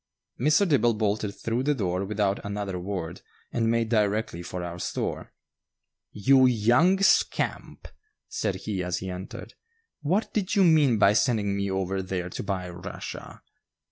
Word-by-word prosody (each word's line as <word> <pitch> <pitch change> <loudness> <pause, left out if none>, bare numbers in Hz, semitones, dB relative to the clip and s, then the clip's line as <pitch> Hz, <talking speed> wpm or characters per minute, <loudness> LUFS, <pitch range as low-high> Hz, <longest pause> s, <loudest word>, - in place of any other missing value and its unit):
Mr. 150 - +3
Dibble 120 -7 +3
bolted 105 -1 -1
through 115 +4 -2
the 145 +2 +1
door 95 -5 -1
without 100 -1 -1
another 100 -2 -4
word 90 -2 -5 0.3
and 115 -1 0
made 115 -1 +1
directly 105 -5 0
for 90 0 -6
our 85 0 -6
store. - - -4 0.8
"You 130 +5 +4
young 125 - +3
scamp!" - - +1 0.4
said 100 -4 -2
he 95 -4 -2
as 90 0 -2
he 95 0 -5
entered; 90 +1 -8 0.5
"what 180 +9 0
did 200 -4 -1
you 200 - +5
mean 150 -8 +4
by 100 0 +5
sending 105 -4 +1
me 100 0 -1
over 95 0 -1
there 90 -1 -4
to - - -5
buy 95 -2 -3
Russia?" 90 +2 -8
105 Hz, 150 wpm, -26 LUFS, 95-120 Hz, 0.8 s, you